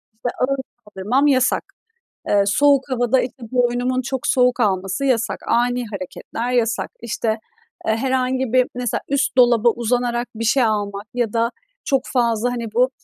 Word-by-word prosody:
işte, 235 +2 -3
ağır 275 +1 +1 0.3
kaldırmam 210 +8 0
yasak. 260 -2 +2 0.7
Eee, 205 -1 +4
soğuk 275 +5 +3
havada, 245 0 +2
işte, 250 0 -6
boynumun 245 +1 +1
çok 260 0 -3
soğuk 250 -1 +3
alması 195 +3 0
yasak. 250 -4 +1
Ani 245 0 +1
hareketler 215 +4 -5
yasak. 230 -2 0
İşte, 235 -1 -3 0.6
eee, 220 - +2
herhangi 260 0 0
bir 255 -1 +5
mesela, 245 -2 -2
üst 280 0 0
dolaba 240 -2 +5
uzanarak 240 +1 -1
bir 230 - -3
şey 250 +3 +3
almak 205 -2 -2
ya 240 -4 -1
da 230 0 +1 0.3
çok 270 -3 +1
fazla, 235 -1 +1
hani, 240 -1 -3
bu 250 +2 +3
245 Hz, 150 wpm, -20 LUFS, 230-255 Hz, 0.7 s, bir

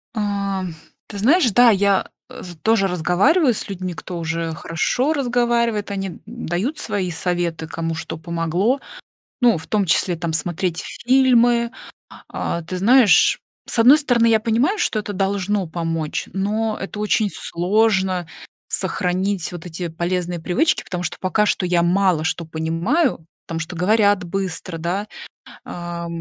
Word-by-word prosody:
А, 200 -2 -2 0.4
ты 205 - -8
знаешь, 260 - +4
да, 245 +4 +6
я 200 -2 +2 0.6
тоже 220 -3 +3
разговариваю 195 - +2
с - - -5
людьми, 185 -2 -5
кто 175 +1 -7
уже 165 0 -2
хорошо 170 - 0
разговаривает, 235 -6 0
они 195 -3 -4
дают 230 - -3
свои 200 -5 -2
советы, 170 -1 -2
кому 165 0 -3
что 160 - -6
помогло, 170 - 0 0.6
ну, 240 -3 +5
в 160 - -11
том 205 -2 0
числе 175 +1 +2
там 165 0 -3
смотреть 170 +2 -1 0.2
фильмы. 240 -2 +4 0.6
А, 170 - -3
ты 180 +3 -5
знаешь, 230 +1 +5 0.3
с - - -2
одной 255 +6 +7
стороны, 245 -6 +2
я 225 -1 +4
понимаю, 240 - +1
что 330 - 0
это 210 -1 -4
должно 195 0 -1
помочь, 165 -2 -3
но 215 +3 -1
это 195 +2 -6
очень 210 0 +1
сложно 190 -1 +1 0.4
сохранить 185 0 0
вот 175 -2 -8
эти 175 +1 -5
полезные 175 +1 -2
привычки, 290 - +1
потому 180 -1 -4
что 175 - -3
пока 200 +3 +1
что 200 - 0
я 175 -1 +2
мало 180 -2 +2
что 170 0 -1
понимаю, 165 - 0 0.2
потому 165 -1 -4
что 165 +2 -5
говорят 205 +1 +3
быстро, 180 -2 -4
да. 180 +5 -2 0.6
А, 175 -1 -6
195 Hz, 140 wpm, -21 LUFS, 175-225 Hz, 0.6 s, одной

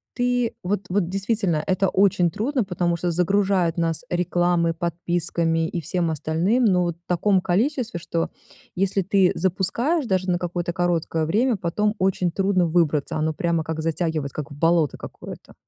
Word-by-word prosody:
ты 245 -1 0
вот 190 +1 -1
вот 180 -2 0
действительно, 195 -5 0
это 190 0 +1
очень 185 -3 +3
трудно, 255 - -1
потому 175 -2 -1
что 175 +1 -1
загружают 180 0 +1
нас 165 +7 -1
рекламой, 175 -1 +1
подписками 170 -1 -1
и 170 0 -4
всем 170 +2 -1
остальным, 165 - +1
но 180 -4 +3
вот 170 -1 -2
в 175 - -45
таком 185 +2 +2
количестве, 225 - 0
что, 165 -1 -2 0.5
если 195 +1 +1
ты 190 0 +3
запускаешь 215 - 0
даже 185 -2 0
на 175 - +2
какое-то 175 -1 -2
короткое 170 -2 0
время, 220 +8 +1
потом 210 +4 0
очень 185 -2 +1
трудно 190 -1 +1
выбраться. 160 -4 +1
Оно 155 +1 0
прямо 170 0 0
как 160 0 -4
затягивать, 160 -3 -1
как 150 -2 -6
в 145 - -8
болото 165 -2 +2
какое-то. - - -10
175 Hz, 160 wpm, -23 LUFS, 165-195 Hz, 0.5 s, очень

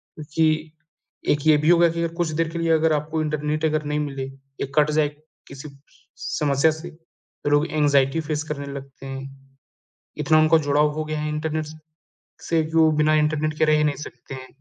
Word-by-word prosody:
क्योंकि 155 +1 0 0.6
एक 150 - +2
ये 155 -1 +6
भी 150 +2 +1
होगा 170 -1 +6
कि 170 +1 -3
अगर 165 - -2
कुछ 175 -2 0
देर 165 - +1
के 170 +1 -5
लिए 165 0 +1
अगर 160 0 +3
आपको 155 +1 -1
इंटरनेट 155 0 -1
अगर 155 0 0
नहीं 150 0 -2
मिले 140 -2 -3
या 135 +1 -8
कट 150 0 +4
जाए 150 0 +2 0.4
किसी 140 +2 -9
स 140 +1 -24 0.3
समस्या 145 +1 +3
से 160 +3 -8
तो 165 -2 -10
लोग 145 +1 +3
एंग्ज़ायटी 145 -1 +2
फ़ेस 155 -1 -3
करने 145 -2 -5
लगते 135 -1 -10
हैं। 135 0 -9 0.6
इतना 155 +1 +4
उनका 155 +1 +5
जुड़ाव 150 +1 +3
हो 155 +1 -3
गया 155 0 -3
है 150 0 -2
इंटरनेट 155 0 -2
स 155 +1 -11 0.7
से 165 -1 +2
जो 160 -1 +5
बिना 150 0 +3
इंटरनेट 155 0 +1
के - - +4
रहे 155 0 +4
ही 150 - +2
नहीं 145 -1 0
सकते 135 -1 -9
हैं। 130 0 -8
150 Hz, 200 wpm, -23 LUFS, 145-155 Hz, 0.7 s, ये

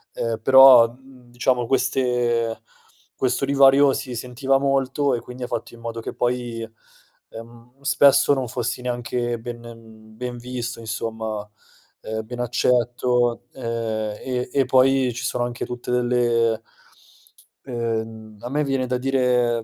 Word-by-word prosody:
Uhm, 115 -1 -2
però 130 -2 +8
diciamo 125 -2 -3
queste 120 -3 0 0.5
questo 130 +1 0
divario 140 0 +5
si 125 -2 -5
sentiva 125 +3 0
molto 135 0 +1
e 120 - 0
quindi 125 0 -9
ha - - -3
fatto 115 - -5
in - - -16
modo 115 0 -5
che - - -6
poi, 120 -1 -2 0.7
ehm, 120 +3 -13
spesso 140 0 +4
non 130 -2 -2
fossi 120 +1 -3
neanche 120 -1 -3
ben 115 -2 -11
ben 125 0 -5
visto 120 -1 -5
insomma, 110 -1 -4 0.5
uhm, 110 0 -5
ben 120 +2 -8
accetto, 120 0 +1
uhm, 130 - -12 0.6
e 125 -1 -3
e 135 -1 +2
poi 130 0 +3
ci 120 +1 -6
sono 120 0 -1
anche 120 0 -5
tutte 125 0 -6
delle 120 -2 +1 1.1
uhm, 110 -3 -4
a 120 - -6
me 150 +3 0
viene 135 -2 -1
da 125 0 -1
dire, 125 -3 +1
120 Hz, 135 wpm, -22 LUFS, 115-130 Hz, 1.1 s, però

